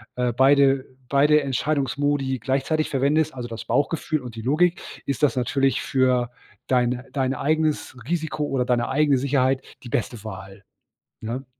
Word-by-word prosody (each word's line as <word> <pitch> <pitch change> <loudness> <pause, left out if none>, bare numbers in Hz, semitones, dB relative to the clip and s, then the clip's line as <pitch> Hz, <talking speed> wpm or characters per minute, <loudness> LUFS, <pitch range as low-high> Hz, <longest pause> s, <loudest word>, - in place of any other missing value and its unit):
äh, 125 -2 0
beide 135 +1 +4 0.2
beide 145 +2 +4
Entscheidungsmodi 140 0 0
gleichzeitig 135 +6 0
verwendest, 145 +3 +1
also 120 -1 -5
das 115 - -7
Bauchgefühl 155 0 0
und 120 -2 -9
die 110 - -6
Logik, 170 +8 +2 0.2
ist 140 0 -3
das 145 -2 +3
natürlich 135 +2 +1
für 125 -2 +1 0.4
deine 125 0 +1
dein 135 -2 0
eigenes 155 0 0
Risiko 160 -3 -1
oder 135 -3 -1
deine 120 -1 0
eigene 145 -1 +3
Sicherheit 130 0 +1 0.2
die 120 - -9
beste 115 -1 -2
Wahl, 100 -2 -9 0.6
ne? 120 +4 -4
135 Hz, 145 wpm, -23 LUFS, 125-145 Hz, 0.6 s, beide